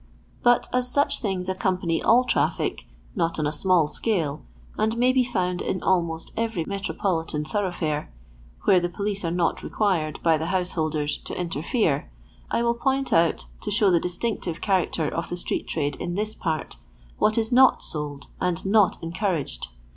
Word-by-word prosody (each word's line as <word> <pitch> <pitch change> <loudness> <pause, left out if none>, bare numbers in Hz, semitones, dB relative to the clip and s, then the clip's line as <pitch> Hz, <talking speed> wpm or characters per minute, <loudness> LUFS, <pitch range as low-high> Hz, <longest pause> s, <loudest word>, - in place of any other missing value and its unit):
But 245 0 +4
as 250 0 +2
such 285 +2 +2
things 190 -4 -2
accompany 185 -3 0
all 245 +2 +5
traffic, - - 0 0.3
not 170 -4 0
on 155 - 0
a 150 - +1
small 170 0 +3
scale, 160 -4 -1 0.3
and 220 +2 0
may 250 +2 +4
be 255 0 +3
found 180 -7 -1
in 185 - -2
almost 170 -3 0
every 225 -8 -1
metropolitan 180 -5 -2
tho 205 +7 -1
roughfare, 160 -6 -2 0.6
where 185 - +5
the 175 0 -1
police 200 +2 -3
are 165 - 0
not 170 0 0
required, 175 -8 0
by 160 -2 +4
the 160 - -2
householders, 160 -5 -1
to - - -7
interfere, 165 - 0 0.4
I 235 - +1
will 235 0 +3
point 270 +3 0
out, 165 0 +3 0.2
to - - -4
show 205 -2 +3
the 170 - +4
distinctive 180 -1 -2
chnracter 180 -5 +1
of 165 - -3
the 175 - -3
street - - -3
trade 145 -3 -2
in 175 0 -4
this 215 +2 -1
part, 160 -6 -3 0.4
what 215 +1 +3
is 225 0 +1
not 260 +1 +5
sold 145 -2 -4
and 180 -1 -1
not 200 0 +4
encouraged. 170 -3 -2
180 Hz, 170 wpm, -25 LUFS, 165-215 Hz, 0.6 s, all